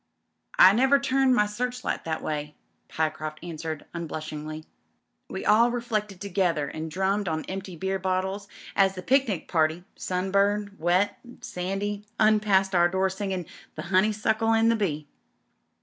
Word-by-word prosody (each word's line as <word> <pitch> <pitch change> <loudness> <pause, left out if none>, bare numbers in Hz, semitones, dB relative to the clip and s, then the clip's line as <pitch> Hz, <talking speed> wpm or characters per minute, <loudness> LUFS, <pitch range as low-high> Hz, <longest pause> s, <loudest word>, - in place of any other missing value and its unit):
"I 190 - +9
never 265 +5 +4
turned 270 -1 +3
my 210 - +4
searchlight 250 +4 -3
that 160 -1 -3
way," 150 -1 -3 0.3
Pyecroft 155 -1 -2
answered 160 -2 -5
unblushingly. 155 -2 -6 0.6
We - - -5
all 225 +3 +5
reflected 215 -5 -3
together, 180 -6 0
and 160 +2 -5
drummed 195 +4 0
on 160 -1 -2
empty 190 -1 -6
beer 190 +3 -2
bottles 190 +2 -2 0.3
as 195 -1 +3
the 185 - -7
picnic 250 - +1
party, 160 +1 +1
sunburned, 200 +2 0
wet, 180 +5 +1
and 245 -1 -12
sandy, 195 +3 -3
passed 210 -3 +3
our 175 -1 +4
door 190 +1 +1
singing 190 -2 -3 0.3
"The 155 - -5
Honeysuckle 215 +3 +2
and 225 +1 +4
the - - +2
Bee." 155 -9 -2
190 Hz, 140 wpm, -26 LUFS, 170-210 Hz, 0.6 s, I